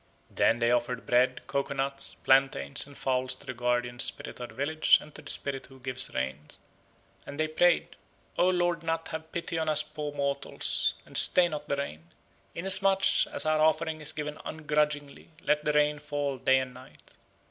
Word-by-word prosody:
Then 115 Hz, -, +2 dB
they 120 Hz, 0 st, +1 dB
offered 120 Hz, 0 st, -1 dB
bread, 125 Hz, +1 st, +1 dB
coco 140 Hz, 0 st, -3 dB
nuts, 135 Hz, 0 st, -3 dB
plantains, 135 Hz, -, +1 dB
and 140 Hz, -, -14 dB
fowls 130 Hz, -1 st, -1 dB
to -, -, -18 dB
the 130 Hz, -, -5 dB
guardian 120 Hz, 0 st, -2 dB
spirit -, -, -3 dB
of 120 Hz, -, -6 dB
the -, -, -15 dB
village 155 Hz, +4 st, +3 dB
and 150 Hz, -, -14 dB
to -, -, -11 dB
the -, -, -8 dB
spirit 135 Hz, -1 st, -2 dB
who 135 Hz, 0 st, -16 dB
gives 130 Hz, 0 st, -2 dB
rain, 65 Hz, +2 st, -3 dB, 0.9 s
and 140 Hz, +2 st, -8 dB
they 155 Hz, -, +1 dB
prayed, 170 Hz, +2 st, +2 dB, 0.4 s
"O 180 Hz, -, +3 dB
Lord 175 Hz, -2 st, 0 dB
nat 165 Hz, 0 st, -3 dB
have 160 Hz, 0 st, -7 dB
pity 170 Hz, -1 st, -3 dB
on 160 Hz, -1 st, -1 dB
us 155 Hz, 0 st, +4 dB
poor 150 Hz, -1 st, -6 dB
mortals, 140 Hz, -1 st, -2 dB
and -, -, -16 dB
stay 180 Hz, -1 st, +7 dB
not 155 Hz, -3 st, -7 dB
the 140 Hz, -, +1 dB
rain. 85 Hz, -, -6 dB, 0.5 s
Inasmuch 195 Hz, +2 st, +4 dB
as -, -, -3 dB
our 155 Hz, 0 st, +2 dB
offering 160 Hz, 0 st, +1 dB
is 150 Hz, 0 st, 0 dB
given 150 Hz, -1 st, -6 dB
ungrudgingly, 150 Hz, -2 st, -2 dB
let 150 Hz, 0 st, 0 dB
the 150 Hz, -, +1 dB
rain 150 Hz, 0 st, +2 dB
fall 145 Hz, -2 st, -3 dB
day 130 Hz, +2 st, +3 dB
and 130 Hz, -1 st, -3 dB
night." 130 Hz, +1 st, -17 dB
145 Hz, 185 wpm, -28 LUFS, 130-155 Hz, 0.9 s, stay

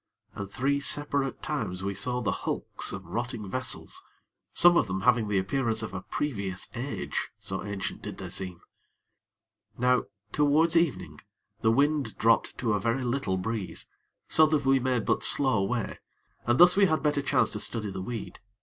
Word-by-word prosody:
And 100 Hz, -1 st, -6 dB
three 140 Hz, +6 st, 0 dB
separate 140 Hz, -1 st, 0 dB
times 105 Hz, -12 st, -3 dB
we 100 Hz, 0 st, -1 dB
saw 125 Hz, +5 st, -2 dB
the 115 Hz, -, 0 dB
hulks -, -, -3 dB
of 95 Hz, -1 st, -7 dB
rotting 115 Hz, +3 st, -4 dB
vessels, 130 Hz, +6 st, -4 dB, 0.5 s
some 175 Hz, 0 st, +6 dB
of 110 Hz, -, +3 dB
them 95 Hz, +1 st, -2 dB
having 115 Hz, 0 st, +3 dB
the 105 Hz, -1 st, +1 dB
appearance 110 Hz, +3 st, 0 dB
of 105 Hz, -, -6 dB
a 90 Hz, -, -4 dB
previous 100 Hz, -8 st, -3 dB
age, 125 Hz, +3 st, -3 dB
so 95 Hz, 0 st, -4 dB
ancient 100 Hz, -2 st, -4 dB
did -, -, -7 dB
they -, -, -7 dB
seem. 90 Hz, -3 st, -3 dB, 1.2 s
Now, 125 Hz, +1 st, +2 dB, 0.3 s
towards 150 Hz, +4 st, +3 dB
evening, 150 Hz, -, 0 dB, 0.4 s
the 110 Hz, -, +2 dB
wind 145 Hz, +4 st, +1 dB
dropped 115 Hz, +1 st, +2 dB
to 115 Hz, -4 st, 0 dB
a 105 Hz, -, +1 dB
very 115 Hz, +5 st, 0 dB
little 120 Hz, -6 st, -1 dB
breeze, 105 Hz, 0 st, -4 dB, 0.4 s
so 155 Hz, 0 st, +5 dB
that 155 Hz, -3 st, 0 dB
we 135 Hz, 0 st, +4 dB
made 125 Hz, -3 st, 0 dB
but -, -, +1 dB
slow 130 Hz, -7 st, +3 dB
way, 115 Hz, +2 st, -2 dB, 0.5 s
and 120 Hz, +1 st, +2 dB
thus 180 Hz, +1 st, +8 dB
we 200 Hz, 0 st, +5 dB
had 155 Hz, -2 st, 0 dB
better 150 Hz, -1 st, +2 dB
chance 130 Hz, -5 st, +2 dB
to 105 Hz, -, -3 dB
study 105 Hz, -1 st, -2 dB
the 95 Hz, -1 st, -5 dB
weed. 115 Hz, +2 st, -6 dB
120 Hz, 175 wpm, -28 LUFS, 100-140 Hz, 1.2 s, thus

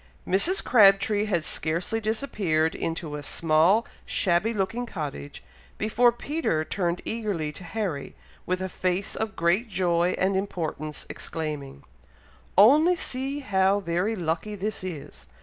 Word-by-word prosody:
Mrs. 330 Hz, -, +3 dB
Crabtree 205 Hz, -2 st, +5 dB
had 175 Hz, -7 st, 0 dB
scarcely 170 Hz, +10 st, -1 dB
disappeared 200 Hz, -, 0 dB
into 165 Hz, -2 st, -4 dB
a 150 Hz, -, -5 dB
small 165 Hz, +9 st, +3 dB, 0.2 s
shabby 185 Hz, +4 st, +1 dB
looking 225 Hz, +4 st, -2 dB
cottage, 145 Hz, -, -6 dB, 0.3 s
before 235 Hz, +3 st, +3 dB
Peter 240 Hz, -, -2 dB
turned 175 Hz, -1 st, -2 dB
eagerly 205 Hz, -9 st, -2 dB
to 155 Hz, -, -11 dB
Harry, 175 Hz, -5 st, -4 dB, 0.3 s
with 185 Hz, +1 st, -1 dB
a -, -, -1 dB
face 185 Hz, +1 st, -2 dB
of 220 Hz, -2 st, -3 dB
great 175 Hz, +8 st, +1 dB
joy 175 Hz, -2 st, +1 dB
and 190 Hz, +1 st, +1 dB
importance, 160 Hz, -6 st, -4 dB
exclaiming, 150 Hz, -, -5 dB, 0.7 s
"Only 300 Hz, -, +6 dB
see 275 Hz, -2 st, -3 dB
how 195 Hz, -4 st, +2 dB
very 180 Hz, +4 st, -1 dB
lucky 175 Hz, +3 st, -2 dB
this 205 Hz, 0 st, -3 dB
is! 170 Hz, -7 st, -8 dB
190 Hz, 130 wpm, -26 LUFS, 165-220 Hz, 0.7 s, Only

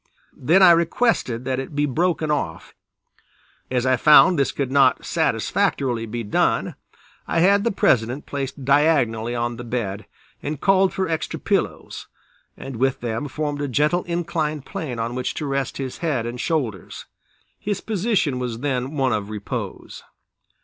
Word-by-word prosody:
Then 175 Hz, +9 st, +4 dB
I 175 Hz, -, +9 dB
requested 170 Hz, -, +1 dB
that 130 Hz, -1 st, -1 dB
it 135 Hz, +2 st, -6 dB
be 145 Hz, 0 st, +2 dB
broken 160 Hz, +2 st, 0 dB
off; 110 Hz, -, -3 dB, 1.0 s
as 125 Hz, -1 st, 0 dB
I 130 Hz, -1 st, +3 dB
found 155 Hz, +5 st, +6 dB
this 140 Hz, -, +2 dB
could 135 Hz, -2 st, -3 dB
not 135 Hz, -2 st, +3 dB
satisfactorily 120 Hz, -4 st, 0 dB
be 115 Hz, +2 st, -4 dB
done, 105 Hz, -, 0 dB, 0.5 s
I 165 Hz, -, +1 dB
had 200 Hz, +3 st, +4 dB
the 235 Hz, -, +2 dB
President 125 Hz, -, +1 dB
placed 135 Hz, -1 st, -5 dB
diagonally 135 Hz, -6 st, +2 dB
on 120 Hz, 0 st, -2 dB
the 120 Hz, -, -7 dB
bed 110 Hz, -4 st, -4 dB, 0.3 s
and 145 Hz, 0 st, -4 dB
called 195 Hz, +1 st, +3 dB
for 190 Hz, -1 st, -2 dB
extra 160 Hz, -1 st, -3 dB
pillows, -, -, -2 dB, 0.5 s
and 135 Hz, -3 st, -7 dB
with 135 Hz, +2 st, 0 dB
them 120 Hz, +4 st, -3 dB
formed 145 Hz, +1 st, -3 dB
a 145 Hz, -, -1 dB
gentle 150 Hz, +7 st, +1 dB
inclined 160 Hz, -4 st, -2 dB
plane 130 Hz, -7 st, -5 dB
on 115 Hz, +1 st, -3 dB
which 125 Hz, 0 st, -3 dB
to 155 Hz, -, -3 dB
rest 135 Hz, -2 st, -2 dB
his 130 Hz, -2 st, -5 dB
head 145 Hz, -9 st, -1 dB
and 120 Hz, +1 st, -5 dB
shoulders. 125 Hz, -, -3 dB, 0.5 s
His 205 Hz, -1 st, -2 dB
position 200 Hz, -, 0 dB
was 120 Hz, -2 st, -4 dB
then 135 Hz, +1 st, -2 dB
one 130 Hz, -3 st, +2 dB
of 105 Hz, -1 st, -3 dB
repose. 105 Hz, -2 st, -6 dB
135 Hz, 155 wpm, -22 LUFS, 120-160 Hz, 1.0 s, I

